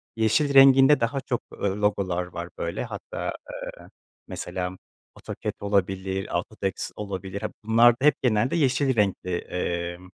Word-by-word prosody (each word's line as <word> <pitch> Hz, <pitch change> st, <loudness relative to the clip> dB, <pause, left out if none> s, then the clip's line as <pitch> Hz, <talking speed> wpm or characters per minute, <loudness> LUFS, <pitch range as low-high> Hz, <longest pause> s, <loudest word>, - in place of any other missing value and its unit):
yeşil 115 Hz, +6 st, +2 dB
renginde 135 Hz, +1 st, +7 dB
daha 115 Hz, +4 st, -1 dB
çok, 125 Hz, -3 st, -2 dB
eee, -, -, -12 dB
logolar 100 Hz, -3 st, 0 dB
var 85 Hz, -1 st, -7 dB
böyle, 85 Hz, -, -3 dB
hatta, -, -, -5 dB, 0.4 s
eee, -, -, -15 dB, 0.4 s
mesela 90 Hz, 0 st, -5 dB, 0.4 s
AutoCAD -, -, -5 dB
olabilir, 95 Hz, -1 st, -1 dB
AutoText 95 Hz, +1 st, -4 dB
olabilir, 100 Hz, -1 st, -5 dB
ha, 110 Hz, -, -2 dB
bunlarda 120 Hz, +4 st, +4 dB
hep 150 Hz, -, +6 dB
genelde 120 Hz, +2 st, +1 dB
yeşil 135 Hz, -3 st, +2 dB
renkli, 100 Hz, -3 st, 0 dB
eee, 85 Hz, 0 st, -3 dB
105 Hz, 130 wpm, -25 LUFS, 95-125 Hz, 0.4 s, renginde